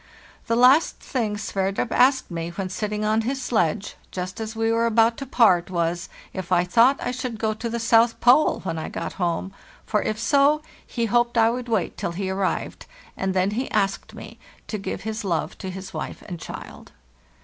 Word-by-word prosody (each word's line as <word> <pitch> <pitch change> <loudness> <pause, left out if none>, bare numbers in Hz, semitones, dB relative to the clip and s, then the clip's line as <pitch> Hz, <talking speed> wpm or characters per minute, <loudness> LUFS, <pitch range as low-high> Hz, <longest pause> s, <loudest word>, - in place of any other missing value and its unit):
The 230 - +1
last 260 +7 +5
thing 220 -5 -2
Sverdrup 195 0 -2
asked 260 -4 +3
me 165 0 -3
when 185 +2 -4
sitting 210 +2 -2
on 215 +1 +2
his 265 +4 -2
sledge, 210 -5 -1
just 185 +2 -5
as 220 0 -5
we 225 0 +1
were 230 +1 +2
about 230 0 +4
to 275 - -6
part, 190 -10 +4
was, 170 -1 -1 0.2
if 185 -1 -6
I 175 -1 +4
thought 230 +10 +4
I 245 - -2
should 250 -2 -4
go 220 0 0
to 230 +2 -5
the 235 - -2
South 230 0 +3
Pole 250 +6 +4
when 165 -3 -3
I 155 - -5
got - - -5
home; 175 +2 -1 0.3
for 210 -2 +1
if 215 - -2
so, 285 +5 +3 0.2
he 235 -2 -1
hoped 240 +2 +1
I 225 0 +5
would 245 0 -5
wait 215 -7 -1
till 170 - -3
he 190 +1 -3
arrived; 190 0 -2 0.3
and 190 0 -2
then 185 +2 +2
he 250 +5 -2
asked 195 -1 -1
me - - -10 0.3
to 215 - -3
give 195 - -4
his 220 0 -4
love 165 -3 -1
to 190 - -5
his 190 +1 -8
wife - - -6
and 175 -2 -6
child. - - -9
215 Hz, 200 wpm, -24 LUFS, 190-235 Hz, 0.3 s, last